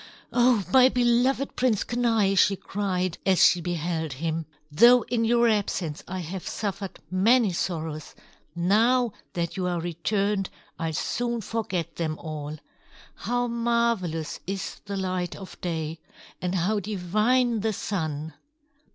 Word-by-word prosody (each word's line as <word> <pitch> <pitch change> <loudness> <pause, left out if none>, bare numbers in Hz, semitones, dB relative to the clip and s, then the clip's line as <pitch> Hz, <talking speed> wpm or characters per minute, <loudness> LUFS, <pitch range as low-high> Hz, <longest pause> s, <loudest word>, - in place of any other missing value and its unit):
"Oh, 245 -4 +4
my 260 -1 +8
beloved 250 +2 +2
Prince 245 -5 +2
Kenai!" 225 -5 +1
she 195 +1 +4
cried, 185 -3 -2
as 190 -2 +4
she 175 - +4
beheld 165 -3 -2
him. 160 +2 -3 0.2
"Though 240 +9 +7
in 230 -1 0
your 235 +1 +4
absence 190 -7 -1
I 185 0 -4
have 180 +2 -6
suffered 200 -2 -4
many 210 +2 +4
sorrows, 160 -3 -3 0.4
now 225 +7 +3 0.2
that 170 0 -3
you 185 -1 -1
are 175 -1 -1
returned, 195 +4 -1 0.3
I'll 165 -1 -2
soon 235 +7 -1
forget 210 -6 -3
them 155 -2 -2
all. 155 -1 -6 0.6
How 245 0 -1
marvelous 235 -9 0
is 195 0 -4
the 200 0 -4
light 185 -2 -2
of 190 - -11
day! 160 -2 -3 0.4
And 180 +1 -1
how 195 +4 +1
divine 215 +5 +1
the 220 +1 0
Sun!" 160 -7 -3
195 Hz, 135 wpm, -26 LUFS, 170-230 Hz, 0.6 s, my